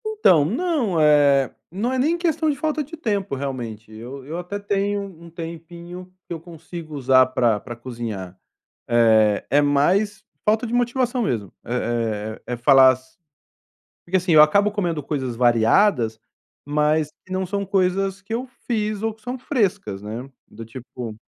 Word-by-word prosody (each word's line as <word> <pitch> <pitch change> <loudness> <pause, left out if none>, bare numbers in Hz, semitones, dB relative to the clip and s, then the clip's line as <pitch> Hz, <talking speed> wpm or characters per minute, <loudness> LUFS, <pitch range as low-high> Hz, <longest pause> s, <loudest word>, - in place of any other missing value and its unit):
Então, 420 - +4
não, 245 - 0
eh, 145 -3 +4 0.2
não 220 +8 -2
é 260 - 0
nem 315 +6 +2
questão 320 -2 0
de 295 - +1
falta 310 +1 -1
de 305 +4 -9
tempo 205 - -2
realmente, 120 -6 -5
eu 125 +5 -9
eu 155 +4 -5
até 180 +3 -5
tenho 200 0 -1
um 170 -4 -11
tempinho 170 +2 -9 0.2
que - - -5
eu 165 - -5
consigo 165 -1 -9
usar 130 -2 +4
pra 120 -4 +1
pra 120 +2 -8
cozinhar, 115 -7 -6 0.5
é 110 -3 +4
é 145 +3 +4
mais 190 +9 +2 0.2
falta 220 +3 +2
de 225 - -5
motivação 245 0 +1
mesmo. 110 - -2
Eh 115 -3 -2
eh, 125 - -3
é - - -3
falar 130 +1 +7
as 130 0 -9 0.9
porque, 190 +2 +1
assim, 180 -1 -1
eu 155 - +9
acabo 200 +7 +4
comendo 175 -7 -2
coisas 130 -4 -3
variadas, 120 - +3 0.5
mas 150 +1 +1 0.2
que 185 - -16
não 185 0 -1
são 200 +2 -2
coisas 195 +1 0
que 225 - -6
eu 245 +3 -2 0.2
fiz 215 -3 -1
ou 225 -1 0
que 220 - -25
são 245 +4 -5
frescas, 200 - -1
né, 110 +5 -6 0.2
do 115 +2 -10
tipo 115 -1 -8
165 Hz, 165 wpm, -22 LUFS, 125-205 Hz, 0.9 s, eu